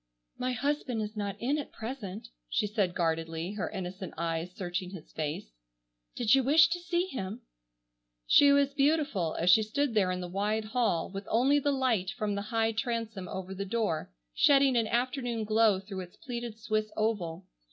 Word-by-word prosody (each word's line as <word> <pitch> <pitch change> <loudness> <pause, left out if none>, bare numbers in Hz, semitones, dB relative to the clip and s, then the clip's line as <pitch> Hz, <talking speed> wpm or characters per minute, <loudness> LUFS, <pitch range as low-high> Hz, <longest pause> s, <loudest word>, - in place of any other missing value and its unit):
"My 255 0 0
husband 260 -1 -1
is 210 +1 -6
not 205 -2 -3
in 280 +5 0
at 290 - -6
present," 225 -2 -6 0.2
she 220 - +1
said 205 -4 0
guardedly, 165 0 -1
her 210 - -3
innocent 190 -1 -6
eyes 165 +1 -2
searching 180 -1 -3
his 180 -4 -10
face, 150 - -4 0.6
"did 230 -3 +3
you 270 -1 +5
wish 315 +6 +6
to 350 +1 -1
see 350 0 0
him?" 210 - -5 0.8
She 285 - +7
was 280 0 +3
beautiful 280 - +1
as 175 +2 +4
she 220 - +7
stood 260 +5 -1
there 200 -4 +3
in 180 0 -1
the 180 - -4
wide 210 +4 -1
hall, 220 -8 0
with 195 +1 -6
only 265 +6 +4
the 285 0 +1
light 250 -9 +1
from 210 0 -2
the 200 - -2
high 225 -1 +2
transom 225 -4 -3
over 190 0 -5
the 195 +1 -4
door, 200 - -1 0.2
shedding 275 - +5
an 230 -2 +2
afternoon 245 -1 -1
glow 215 -2 +3
through 195 0 -7
its 180 -1 -8
pleated 240 -6 -6
Swiss 215 -1 -1
oval. 190 -6 -1
215 Hz, 180 wpm, -30 LUFS, 185-255 Hz, 0.8 s, She